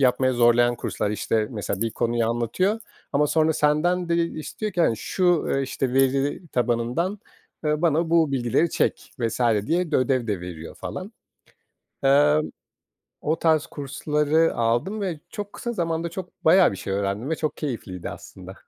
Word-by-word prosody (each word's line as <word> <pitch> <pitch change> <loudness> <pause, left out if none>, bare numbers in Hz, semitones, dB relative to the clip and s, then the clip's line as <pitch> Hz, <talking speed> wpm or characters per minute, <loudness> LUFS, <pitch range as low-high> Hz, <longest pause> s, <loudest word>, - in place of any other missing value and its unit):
yapmaya 130 0 +3
zorlayan 120 0 +4
kurslar. 105 -2 -2
İşte, 105 +1 0
mesela 100 -3 -3
bir 115 - -1
konuyu 115 0 0
anlatıyor 120 - 0 0.3
ama 150 +1 +3
sonra 160 +1 +2
senden 165 +4 +1
de 170 - +2
istiyor 170 +5 -3
ki, 175 - -1
hani, 115 - +3
şu, 175 - +1
eee, 135 - +1
işte, 130 -1 -2
veri 135 +5 +1
tabanından, 125 - 0 0.5
ııı, 150 +1 0
bana 165 0 +2
bu 165 -4 +3
bilgileri 130 +6 +1
çek - - -1
vs. 115 0 -2 0.3
diye 170 +2 0
de - - +5
ödev 130 -2 +1
de 100 -5 -2
veriyor 85 -2 -8
falan. - - -6 0.9
Emm, 145 +3 +4 0.7
o 155 +2 0
tarz 160 -2 +3
kursları 150 +2 0
aldım 120 - 0
ve 180 -6 -3
çok 205 -1 -6
kısa 240 0 -4
zamanda 165 -2 -1
çok 180 +1 -9
bayağı 180 +3 +6
bir 100 - -6
şey 95 +1 -4
öğrendim 100 +6 -2
ve 160 - +1
çok 155 -1 -3
keyifliydi 110 - -5
aslında. - - -10
145 Hz, 160 wpm, -24 LUFS, 120-165 Hz, 0.9 s, bayağı